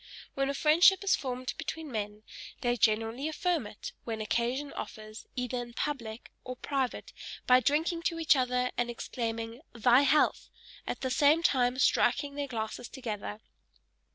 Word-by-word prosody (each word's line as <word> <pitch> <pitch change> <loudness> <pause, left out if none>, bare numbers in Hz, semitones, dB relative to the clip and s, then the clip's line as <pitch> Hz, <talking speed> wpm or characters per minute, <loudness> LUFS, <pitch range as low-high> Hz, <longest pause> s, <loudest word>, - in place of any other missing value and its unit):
When 275 0 0
a 280 - -1
friendship 345 +7 +5
is 395 - +4
formed 255 -1 -4
between 320 -2 -5
men, 210 -1 -4 0.4
they 240 0 +1
generally 225 +4 +1
affirm 315 - 0
it, 210 - -8
when 225 -2 -4
occasion 240 +6 -1
offers, 215 0 -8
either 250 0 -2
in 240 -1 -9
public 235 -6 -4
or 255 0 -6
private, 265 0 -3 0.3
by 250 0 +6
drinking 315 +6 +1
to 335 - 0
each 325 -1 +4
other 250 -1 +1
and 240 0 +1
exclaiming, 230 0 -4
"thy 240 +3 +5
health," 285 +2 +2 0.4
at - - -4
the 260 -1 -1
same 295 +6 +4
time 250 -4 +2
striking 280 +1 +2
their 285 0 -3
glasses 230 -1 -4
together. 215 -4 -5
250 Hz, 155 wpm, -30 LUFS, 230-285 Hz, 0.4 s, by